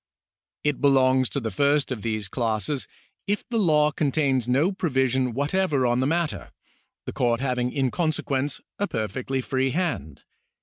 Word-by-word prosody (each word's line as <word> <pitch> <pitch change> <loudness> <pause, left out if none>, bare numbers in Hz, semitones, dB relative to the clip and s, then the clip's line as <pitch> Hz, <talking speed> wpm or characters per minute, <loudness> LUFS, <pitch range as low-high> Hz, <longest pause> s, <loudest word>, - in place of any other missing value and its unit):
It 145 -2 0
belongs 130 -2 +4
to 140 - -2
the 115 -4 -3
first 140 +5 +2
of 120 -5 -3
these 110 -3 -2
classes, 115 +4 -2 0.4
if 205 +1 -1
the 230 -2 0
law 150 -6 +4
con 145 -2 0
tains 135 -5 +1
no 140 +9 +3
provision 130 - 0
whatever 145 -1 +1
on 120 0 +2
the 130 - +1
matter, 165 +1 -1 0.6
the - - -5
court 120 -2 +1
having 125 -2 -1
in 135 -2 0
consequence 145 -4 -1 0.2
a 205 - +1
perfectly 125 - -2
free 130 +1 0
hand. 135 - -3
135 Hz, 160 wpm, -25 LUFS, 125-150 Hz, 0.6 s, belongs